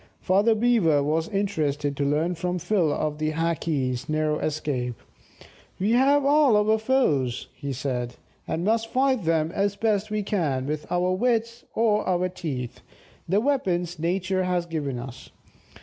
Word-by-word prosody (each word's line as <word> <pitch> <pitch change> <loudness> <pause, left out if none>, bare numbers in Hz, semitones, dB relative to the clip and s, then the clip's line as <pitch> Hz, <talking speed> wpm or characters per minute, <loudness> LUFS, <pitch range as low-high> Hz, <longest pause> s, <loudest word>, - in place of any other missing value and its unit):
Father 200 +4 +3
Beaver 210 -11 +3
was 160 +4 0
interested 150 -9 -1
to 140 - -1
learn 160 +5 +1
from 180 +1 -2
Phil 180 -3 +1
of 150 0 -2
the 155 0 -1
Hackees' 150 -5 -1
narrow 155 0 0
escape. 135 -5 -2 0.8
"We 200 +4 +1
have 275 +4 +4
all 285 -5 +5
our 215 +1 +3
foes," 155 - +1
he 140 -1 -6
said, 125 -2 -3 0.3
"and 165 - -2
must 225 +1 +1
fight 260 -4 +1
them 160 -1 +1
as 200 +1 0
best 215 -1 0
we 210 0 -1
can, 150 -11 -1
with 150 +1 -4
our 180 +1 +1
wits 230 +3 0
or 215 -2 +2
our 185 0 +1
teeth, 140 -9 -5 0.5
the 195 +3 +3
weapons 180 - 0
Nature 185 +3 0
has 180 -1 0
given 150 -6 -3
us. 125 +1 -9
175 Hz, 150 wpm, -25 LUFS, 150-215 Hz, 0.8 s, all